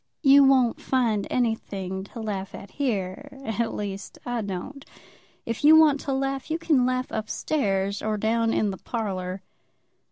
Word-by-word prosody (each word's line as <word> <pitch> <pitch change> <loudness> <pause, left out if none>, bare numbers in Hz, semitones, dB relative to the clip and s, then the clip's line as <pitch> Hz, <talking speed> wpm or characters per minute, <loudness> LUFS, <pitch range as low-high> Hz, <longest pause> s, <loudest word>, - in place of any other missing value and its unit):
"You 280 0 +8
won't 260 -3 +3
find 230 -6 0
anything 195 -6 -2
to 230 +3 -9
laugh 195 -3 -4
at 200 - -10
here; 255 +1 -3
at 225 +1 -1
least, 200 -1 -5
I 245 -1 -2
don't. 205 +8 -6 0.6
If 230 +3 -4
you 310 +2 +8
want 300 -3 +5
to 275 - -4
laugh, 270 +1 -2
you 320 - 0
can 300 -7 +2
laugh 255 0 -1
up 215 -1 -3
stairs, 200 -9 -1
or 215 0 -1
down 225 +2 +1
in 210 -3 +1
the 190 - -6
parlour." 190 -5 -4
230 Hz, 160 wpm, -25 LUFS, 200-270 Hz, 0.6 s, You